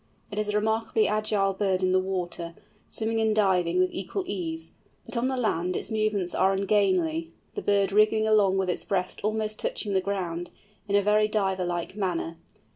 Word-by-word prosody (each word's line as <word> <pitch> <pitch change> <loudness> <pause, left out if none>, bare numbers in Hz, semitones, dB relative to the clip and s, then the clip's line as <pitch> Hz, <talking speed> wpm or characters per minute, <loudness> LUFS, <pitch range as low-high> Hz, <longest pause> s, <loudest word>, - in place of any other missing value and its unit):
It 205 - -3
is 210 0 0
a 210 - -1
remarkably 220 +1 +1
agile 210 -2 +1
bird 190 -1 0
in 185 - +3
the 185 - +4
water, 175 -3 -3 0.3
swimming 225 0 -1
and 220 -1 +2
diving 180 -4 +2
with 185 0 +3
equal 195 - -3
ease, 165 - -4 0.3
but - - -4
on 235 +2 +1
the 260 0 -1
land 180 -6 0
its - - -3
movements 215 -4 0
are 190 +1 +3
ungainly, 185 -5 +1 0.2
the - - -4
bird 200 -1 +2
wriggling 215 +1 +4
along 205 -3 +4
with 190 -1 0
its - - -3
breast 185 -2 -2
almost 215 0 -1
touching 205 -3 -1
the 190 - +2
ground, 175 -3 -3 0.4
in 200 - +1
a 205 - +4
very 210 +1 +3
Diver 190 -4 0
like 175 +1 -3
manner. 175 -4 -2
195 Hz, 190 wpm, -27 LUFS, 180-215 Hz, 0.4 s, the